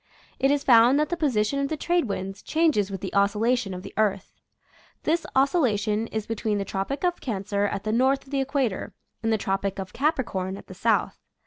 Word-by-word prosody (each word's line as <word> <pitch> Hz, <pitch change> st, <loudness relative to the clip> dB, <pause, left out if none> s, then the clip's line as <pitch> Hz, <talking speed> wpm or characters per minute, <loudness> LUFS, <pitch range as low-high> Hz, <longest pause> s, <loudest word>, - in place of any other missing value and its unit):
It 270 Hz, -, +3 dB
is 285 Hz, 0 st, +1 dB
found 245 Hz, +2 st, +6 dB
that 300 Hz, 0 st, +1 dB
the 345 Hz, -, 0 dB
position 275 Hz, -6 st, +1 dB
of 280 Hz, -, 0 dB
the 315 Hz, -, -3 dB
trade 345 Hz, +1 st, +1 dB
winds 195 Hz, -2 st, -4 dB
changes 310 Hz, -, +1 dB
with 195 Hz, -2 st, -6 dB
the 190 Hz, -, -5 dB
oscillation 210 Hz, +2 st, +2 dB
of 180 Hz, 0 st, -6 dB
the -, -, -9 dB
earth. 200 Hz, -3 st, 0 dB, 0.7 s
This 330 Hz, +2 st, 0 dB
oscillation 230 Hz, -, +2 dB
is 220 Hz, -1 st, -4 dB
between 215 Hz, -1 st, -1 dB
the 200 Hz, -, -2 dB
Tropic 195 Hz, -, -3 dB
of 355 Hz, -1 st, 0 dB
Cancer 200 Hz, -3 st, -1 dB
at 200 Hz, -, -3 dB
the 215 Hz, -, -1 dB
north 260 Hz, +4 st, +2 dB
of 270 Hz, -, -18 dB
the 275 Hz, -1 st, +1 dB
equator 270 Hz, -7 st, -2 dB, 0.3 s
and 225 Hz, 0 st, 0 dB
the 220 Hz, -, +3 dB
Tropic 195 Hz, -1 st, -2 dB
of 190 Hz, -1 st, -6 dB
Capricorn 230 Hz, -, -1 dB
at -, -, -12 dB
the -, -, -10 dB
south. -, -, 0 dB
225 Hz, 205 wpm, -25 LUFS, 200-275 Hz, 0.7 s, found